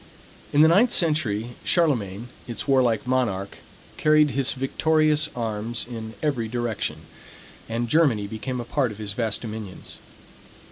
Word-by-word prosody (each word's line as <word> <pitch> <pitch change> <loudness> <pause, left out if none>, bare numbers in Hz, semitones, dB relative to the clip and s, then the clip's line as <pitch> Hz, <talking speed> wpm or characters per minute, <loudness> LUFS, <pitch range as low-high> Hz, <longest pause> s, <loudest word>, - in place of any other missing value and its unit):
In 145 - +4
the 160 - +8
ninth 205 +9 +5
century 130 - +1
Charlemagne, 120 - 0 0.2
its 120 +3 -5
warlike 125 -5 +3
monarch, 120 -7 -1 0.4
carried 155 -1 +4
his 135 0 +1
victorious 155 +3 +2
arms 115 0 -3
in 110 -2 -7
every 130 -7 0
direction; 120 -1 -3 0.7
and 115 +1 -1
Germany 125 -7 +3
became 115 +5 -4
a 120 - -4
part 125 -1 0
of 105 - -9
his 105 -2 -5
vast 110 -1 -1
dominions. 110 -4 -7
120 Hz, 135 wpm, -24 LUFS, 110-150 Hz, 0.7 s, the